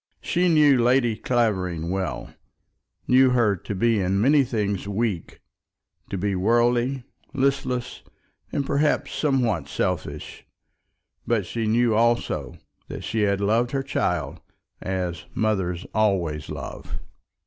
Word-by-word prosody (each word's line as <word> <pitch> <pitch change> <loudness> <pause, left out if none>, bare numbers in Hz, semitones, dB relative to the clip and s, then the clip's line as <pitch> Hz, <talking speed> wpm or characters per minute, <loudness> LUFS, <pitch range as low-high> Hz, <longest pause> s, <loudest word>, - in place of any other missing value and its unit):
She 180 +1 +1
knew 150 -6 +5
Lady 120 -1 +3
Clavering 95 -9 0
well; 95 -1 -3 0.7
knew 130 +1 +5
her 120 -5 +3
to 100 +3 -6
be 115 +2 +2
in 95 +1 +1
many 140 +6 +5
things 105 -6 -2
weak, 100 -4 -3 0.7
to 100 - -3
be 100 +2 -1
worldly, 120 +6 +2 0.3
listless, 130 -2 -1 0.5
and 140 - -1
perhaps 145 +2 +1
somewhat 120 - 0
selfish; 80 -2 -3 0.8
but 110 -5 +1
she 115 +4 -3
knew 115 +1 +3
also 120 +2 +1 0.3
that - - -7
she 110 - -1
had 100 -1 +1
loved 115 +4 +2
her 135 -1 0
child 85 - -2 0.4
as 90 -2 -3
mothers 95 -5 -1
always 90 -9 0
love. 70 -5 -7
110 Hz, 120 wpm, -24 LUFS, 95-125 Hz, 0.8 s, knew